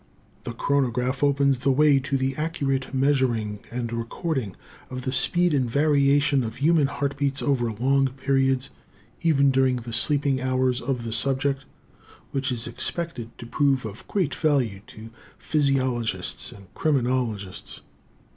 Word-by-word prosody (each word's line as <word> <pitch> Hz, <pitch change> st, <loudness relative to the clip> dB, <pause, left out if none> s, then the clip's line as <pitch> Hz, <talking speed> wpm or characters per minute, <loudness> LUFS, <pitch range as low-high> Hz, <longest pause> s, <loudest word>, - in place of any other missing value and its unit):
The 120 Hz, -, -4 dB
chronograph 130 Hz, 0 st, 0 dB
opens 140 Hz, -2 st, +2 dB
the 135 Hz, +2 st, 0 dB
way 145 Hz, +1 st, +4 dB
to 135 Hz, +1 st, -2 dB
the 130 Hz, 0 st, -1 dB
accurate 140 Hz, -4 st, -2 dB
measuring 130 Hz, -6 st, 0 dB
and 120 Hz, -1 st, -4 dB
recording 115 Hz, -, -3 dB, 0.3 s
of 130 Hz, 0 st, -6 dB
the 130 Hz, -, -2 dB
speed 175 Hz, +5 st, +4 dB
and 130 Hz, -4 st, +1 dB
variation 140 Hz, 0 st, +3 dB
of 110 Hz, -1 st, -5 dB
human 155 Hz, 0 st, +3 dB
heart 140 Hz, 0 st, -3 dB
beats 140 Hz, -1 st, -1 dB
over 120 Hz, -5 st, 0 dB
long 135 Hz, +5 st, +2 dB
periods, 135 Hz, 0 st, 0 dB, 0.5 s
even 140 Hz, -5 st, +3 dB
during 130 Hz, -1 st, +2 dB
the 120 Hz, -1 st, -6 dB
sleeping 135 Hz, +3 st, +3 dB
hours 130 Hz, -1 st, 0 dB
of 125 Hz, -1 st, -2 dB
the 115 Hz, -1 st, -4 dB
subject, 135 Hz, +3 st, +1 dB, 0.7 s
which 135 Hz, 0 st, -1 dB
is 120 Hz, -2 st, -2 dB
expected 120 Hz, -1 st, -5 dB
to -, -, -9 dB
prove 135 Hz, 0 st, +1 dB
of 110 Hz, 0 st, -9 dB
great 180 Hz, -9 st, -1 dB
value 130 Hz, -11 st, 0 dB
to 110 Hz, +1 st, -12 dB, 0.3 s
physiologists 130 Hz, -6 st, -1 dB
and 100 Hz, -2 st, -15 dB
criminologists. 125 Hz, -, -2 dB
135 Hz, 140 wpm, -24 LUFS, 120-140 Hz, 0.7 s, way